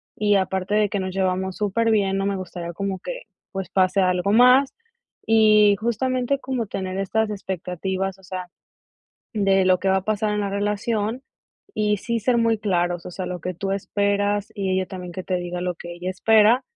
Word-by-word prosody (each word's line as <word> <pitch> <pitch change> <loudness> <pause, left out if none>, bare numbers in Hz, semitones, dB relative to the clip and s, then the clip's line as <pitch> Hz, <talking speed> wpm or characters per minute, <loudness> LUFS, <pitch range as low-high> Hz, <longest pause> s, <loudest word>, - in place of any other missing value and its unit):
y 205 -1 +2
aparte 190 +1 0
de 210 -1 +3
que 200 -1 -2
nos 185 -1 -3
llevamos 190 0 -1
súper 225 +2 +1
bien, 195 -3 +2
no 195 - -1
me 200 -1 -1
gustaría 175 -2 -6
como 195 +1 -3
que, - - -6 0.3
pues, 190 -3 -5
pase 190 +1 +2
algo 180 +1 +1
más", 250 +4 +6 0.5
y 215 -2 +5
justamente 255 +4 0
como 255 -5 -3
tener 190 -1 -4
estas 215 +3 0
expectativas, 190 0 -3
o - - -21
sea, 185 0 -6 0.9
de 195 -2 +3
lo 185 -1 +4
que 195 - -1
va 190 - +3
a 190 - -7
pasar 215 0 0
en 210 - -1
la 200 - -1
relación, 210 +4 -1 0.5
y 210 -1 +1
sí 230 +2 -2
ser 240 +2 +2
muy 230 -1 +2
claros, 175 -4 0
o - - -6
sea, 185 0 -5
lo 180 -1 -5
que 180 - -3
tú 195 +3 -4
esperas, 205 +1 0
y 195 -2 -2
ella 185 0 0
también 180 -2 -8
que 185 +1 -6
te 185 - -1
diga 175 0 -4
lo 180 -1 -2
que 175 0 -8
ella 180 +2 -4
espera 220 +5 +4
195 Hz, 195 wpm, -23 LUFS, 185-215 Hz, 0.9 s, más